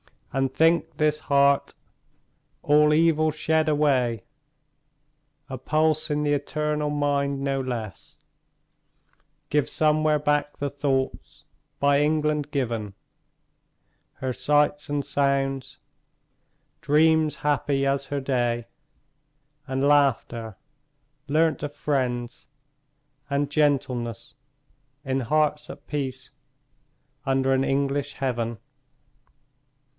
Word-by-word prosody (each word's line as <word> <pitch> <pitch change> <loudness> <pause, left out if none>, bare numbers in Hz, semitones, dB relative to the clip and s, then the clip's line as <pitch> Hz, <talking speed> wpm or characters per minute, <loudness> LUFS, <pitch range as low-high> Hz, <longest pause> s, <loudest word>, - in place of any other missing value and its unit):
And 135 0 0
think, 165 +4 +2
this 150 0 +1
heart, 140 -2 +2 0.9
all 150 +1 +4
evil 155 0 +3
shed 155 +1 0
away, 135 -7 +1 1.2
A 130 - -6
pulse 155 +4 +1
in 150 0 0
the 145 - +1
eternal 150 +1 -1
mind, 140 -1 0
no 135 -1 0
less 115 -6 -6 1.3
Gives 150 -1 +1
somewhere 155 0 +2
back 150 0 0
the 145 - -2
thoughts 140 -2 -3 0.4
by 140 0 +3
England 150 -1 0
given; 115 -8 -3 1.2
Her 130 -1 -4
sights 145 +3 +1
and 145 -1 -1
sounds; 135 -1 -1 1.0
dreams 155 +1 +3
happy 145 -1 +1
as 135 0 0
her 145 -1 -3
day; 120 -3 -1 1.0
And 135 0 -2
laughter, 130 -6 +1 0.7
learnt 155 +1 +2
of 145 -1 -4
friends; 125 -5 -2 0.8
and 140 0 -1
gentleness, 125 -6 0 0.7
In 135 -2 -1
hearts 150 +3 0
at 145 - -10
peace, 130 -3 -5 0.9
under 135 0 +2
an 135 0 +1
English 140 +1 -1
heaven. 120 -4 -2
140 Hz, 95 wpm, -25 LUFS, 130-150 Hz, 1.3 s, all